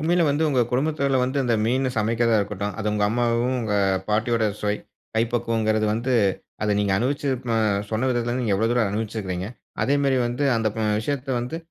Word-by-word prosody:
உண்மையில 170 Hz, +3 st, +2 dB
வந்து 145 Hz, +3 st, +1 dB
உங்க 130 Hz, -4 st, +2 dB
குடும்பத்தில 140 Hz, +1 st, +1 dB
வந்து 130 Hz, +3 st, 0 dB
அந்த 120 Hz, -2 st, +1 dB
மீன் 130 Hz, +3 st, +1 dB
சமைக்கிறதா 115 Hz, +1 st, +2 dB
இருக்கட்டும், 100 Hz, 0 st, -3 dB
அத 110 Hz, -, -4 dB
உங்க 105 Hz, -1 st, +1 dB
அம்மாவும், 120 Hz, +2 st, +1 dB
உங்க 105 Hz, -2 st, -1 dB, 0.3 s
பாட்டியோட 110 Hz, +1 st, +1 dB, 0.2 s
சுவை, 105 Hz, 0 st, 0 dB, 0.4 s
கைப்பக்குவங்கிறது 115 Hz, -2 st, +1 dB
வந்து 120 Hz, +4 st, -1 dB, 0.5 s
அதை 105 Hz, -1 st, +1 dB
நீங்க 100 Hz, -2 st, +1 dB
அனுபவிச்சு 140 Hz, +4 st, -1 dB, 0.3 s
அ -, -, +2 dB, 0.3 s
சொன்ன 115 Hz, +4 st, 0 dB
விதத்திலேருந்து 120 Hz, +1 st, -1 dB
நீங்க 105 Hz, -4 st, +1 dB
எவ்வளோ 115 Hz, +3 st, +1 dB
தூரம் 120 Hz, -4 st, +2 dB
அனுபவிச்சிருக்கிறீங்க? 105 Hz, -4 st, -3 dB, 0.4 s
அதேமாரி 140 Hz, -1 st, +2 dB
வந்து 120 Hz, +4 st, -2 dB
அந்த 110 Hz, -1 st, +1 dB
ப -, -, -4 dB, 0.2 s
விஷயத்தை 135 Hz, +2 st, -2 dB
வந்து 125 Hz, +7 st, -4 dB
115 Hz, 170 wpm, -24 LUFS, 110-130 Hz, 0.5 s, உண்மையில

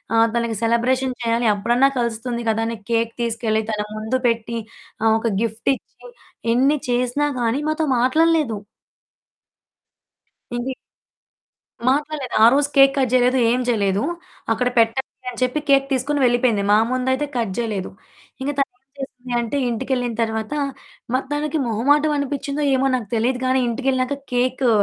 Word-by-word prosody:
ఆహ్, 225 Hz, 0 st, +5 dB
తనకి 235 Hz, -1 st, 0 dB
సెలబ్రేషన్ 250 Hz, +3 st, +1 dB
చేయాలి. 230 Hz, 0 st, +1 dB
అప్పుడన్నా 240 Hz, +6 st, +3 dB
కలుస్తుంది 235 Hz, +1 st, -2 dB
కదా! 225 Hz, +1 st, +1 dB
అని 230 Hz, 0 st, -4 dB
కేక్ 230 Hz, 0 st, +1 dB
తీసుకెళ్ళి, 225 Hz, -1 st, 0 dB
తన 210 Hz, -, -1 dB, 0.2 s
ముందు 220 Hz, +4 st, -1 dB
పెట్టి, 230 Hz, 0 st, -1 dB, 0.5 s
ఆహ్, 220 Hz, -1 st, +4 dB
ఒక 230 Hz, 0 st, -1 dB
గిఫ్టిచ్చి, 230 Hz, -, -3 dB, 0.5 s
ఎన్ని 270 Hz, +5 st, +3 dB
చేసినా 250 Hz, +4 st, +1 dB
గానీ 240 Hz, +4 st, 0 dB
మాతో 310 Hz, 0 st, 0 dB
మాట్లాడలేదు. 305 Hz, -2 st, +2 dB, 2.0 s
ఇంకే 245 Hz, +2 st, -2 dB, 1.2 s
మాట్లాడలేదు. 290 Hz, -2 st, -1 dB
ఆ -, -, +10 dB
రోజు 285 Hz, +1 st, +3 dB
కేక్ 275 Hz, 0 st, +7 dB
కట్ 260 Hz, -3 st, +1 dB
జేయలేదు, 250 Hz, +1 st, +4 dB
ఏమి 250 Hz, +1 st, +1 dB
చేయలేదు. 200 Hz, -3 st, +1 dB, 0.5 s
"అక్కడ 245 Hz, +2 st, +1 dB
పెట్టండి" 230 Hz, +3 st, -1 dB
అని 245 Hz, -, -8 dB
చెప్పి 255 Hz, +4 st, 0 dB
కేక్ 275 Hz, -1 st, +5 dB
తీసుకొని 280 Hz, +3 st, 0 dB
వెళ్ళిపోయింది. 240 Hz, -4 st, +2 dB
మా -, -, +6 dB
ముందయితే 260 Hz, +2 st, 0 dB
కట్ 225 Hz, -5 st, -1 dB
చేయలేదు. 215 Hz, -5 st, -2 dB, 0.5 s
ఇంక 270 Hz, -, -2 dB
తనేం 275 Hz, -2 st, -1 dB, 0.2 s
జేసింది 255 Hz, -2 st, -7 dB
అంటే, 235 Hz, +4 st, -2 dB
ఇంటికెళ్ళిన 245 Hz, 0 st, -1 dB
తరువాత, 220 Hz, +2 st, -2 dB, 0.6 s
మ -, -, +4 dB, 0.2 s
తనకి 295 Hz, +1 st, -1 dB
మొహమాటం 290 Hz, +7 st, +2 dB
అనిపిచ్చిందో 280 Hz, +1 st, -2 dB
ఏమో 260 Hz, +1 st, +1 dB
నాకు 240 Hz, -4 st, -4 dB
తెలీదు 245 Hz, +3 st, +1 dB
గానీ, 260 Hz, +1 st, +2 dB
ఇంటికెళ్ళినాక 260 Hz, +2 st, 0 dB, 0.2 s
కేకు 250 Hz, +1 st, +1 dB
245 Hz, 140 wpm, -21 LUFS, 230-270 Hz, 2.0 s, ఆ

